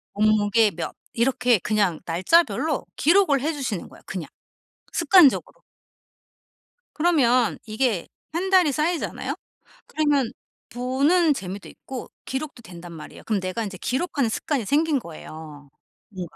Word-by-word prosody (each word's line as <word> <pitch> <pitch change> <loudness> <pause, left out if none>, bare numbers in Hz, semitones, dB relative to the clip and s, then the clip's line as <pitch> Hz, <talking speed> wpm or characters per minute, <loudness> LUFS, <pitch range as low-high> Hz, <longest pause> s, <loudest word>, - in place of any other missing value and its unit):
몸무게 215 0 +3
몇 170 0 -5 0.2
이렇게 245 -2 +2
그냥 205 -5 0
날짜별로 290 - +2
기록을 330 -3 +4
해 315 +4 0
주시는 250 - -4
거야, - - -16
그냥 180 -6 -5 0.7
습관적으로. 350 -9 +5 1.5
그러면 255 -8 +3
이게 220 -4 -1 0.2
1 360 +4 -2
달이 365 -6 +5
쌓이잖아요. 320 +4 -2 0.5
그러면 290 -6 +1 0.4
보는 280 +7 +2
재미도 195 -4 -7
있고 260 -2 -8 0.2
기록도 265 -2 -5
된단 175 -3 -11
말이에요. 155 -2 -11
그럼 215 -3 0
내가 185 +5 -3
인제 200 -3 -6
기록하는 265 - -1
습관이 255 +1 -2
생긴 295 +4 +2
거예요 155 - -11 0.4
뭔가. 180 -6 -8
245 Hz, 295 characters per minute, -24 LUFS, 195-300 Hz, 1.5 s, 습관적으로